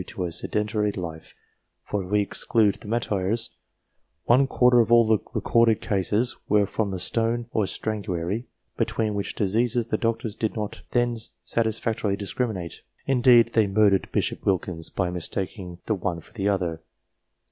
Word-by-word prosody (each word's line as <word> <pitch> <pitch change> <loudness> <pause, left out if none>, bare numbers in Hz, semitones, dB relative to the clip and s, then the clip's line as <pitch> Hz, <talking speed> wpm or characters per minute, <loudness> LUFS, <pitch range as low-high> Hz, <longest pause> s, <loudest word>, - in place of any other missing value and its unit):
to 90 - -4
a 85 - -4
sedentary 105 +4 -1
life, 85 -5 -7 0.5
for, 100 -2 -3
if 90 - -10
we 105 0 +3
exclude 105 +1 +2
the 110 - -13
martyrs, 110 -1 0 0.7
one 130 +3 +4
quarter 125 -2 +4
of 115 0 +2
all 120 -1 +7
the 110 -1 +3 0.2
recorded 115 -2 +3
cases 105 +4 0
were 105 0 +4
from 105 +1 -2
the 95 - -3
stone 115 +5 0
or 110 - +1
strangury, 105 0 -2 0.3
between 110 -2 0
which 100 -1 -3
diseases 115 +3 0
the - - 0
doctors 115 -2 -1
did 110 -1 -2
not 105 -2 -4
then 120 -1 +1 0.3
satis 110 -1 0
factorily 105 -3 -1
discriminate; 100 -4 -3 0.2
indeed, 125 -3 +5
they 110 -3 +4
murdered 100 -1 +3
Bishop - - -1
Wilkins 90 -3 -1
by 90 -2 -1
mistaking 90 +1 -4
the 110 - +1
one 90 -3 -2
for 85 - -18
the 100 -3 0
other. 85 -5 -1
105 Hz, 160 wpm, -25 LUFS, 95-115 Hz, 0.7 s, all